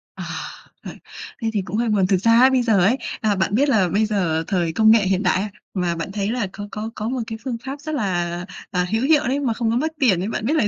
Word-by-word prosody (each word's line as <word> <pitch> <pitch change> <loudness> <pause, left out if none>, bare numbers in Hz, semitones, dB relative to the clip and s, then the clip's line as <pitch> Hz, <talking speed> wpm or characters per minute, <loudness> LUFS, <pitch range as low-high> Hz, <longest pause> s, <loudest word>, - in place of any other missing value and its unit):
À. - - -7 0.6
Ờ, - - -5 0.5
thế 225 - 0
thì 205 - 0
cũng 200 +4 -3
hơi 235 -1 0
buồn. 195 -3 +2
Thực 190 -2 +3
ra 230 +5 +4
ấy 260 +1 +7
bây 260 -1 +2
giờ 220 -5 +3
ấy, 220 +9 +3 0.2
à, 210 -2 +1
bạn 190 +2 0
biết 280 +3 +3
là 200 -8 +3
bây 215 +4 +2
giờ 175 -7 0
thời 170 -4 0
công 220 +2 +5
nghệ 220 -3 +4
hiện 190 +2 +1
đại, 185 +1 +2
a, 210 - -3 0.2
mà 175 -3 -1
bạn 165 +3 -5
thấy 205 +1 -2
là 235 -5 -1
có 205 0 -7
có 215 +1 -4
có 215 +2 -3
một 255 -1 -2
cái 225 -1 -5
phương 245 -3 -3
pháp 280 +2 -6
rất 310 0 -4
là, 175 -7 -1 0.4
à, 180 -1 0
hữu 225 +3 +1
hiệu 300 0 +3
đấy 275 +3 0
mà 250 -5 0
không 225 0 -1
có - - 0
mất 315 +4 -1
tiền 195 -10 +3
ấy, 195 - -2
bạn 220 - -3
biết 295 - +1
là 220 -9 +2
215 Hz, 285 wpm, -21 LUFS, 190-240 Hz, 0.6 s, ấy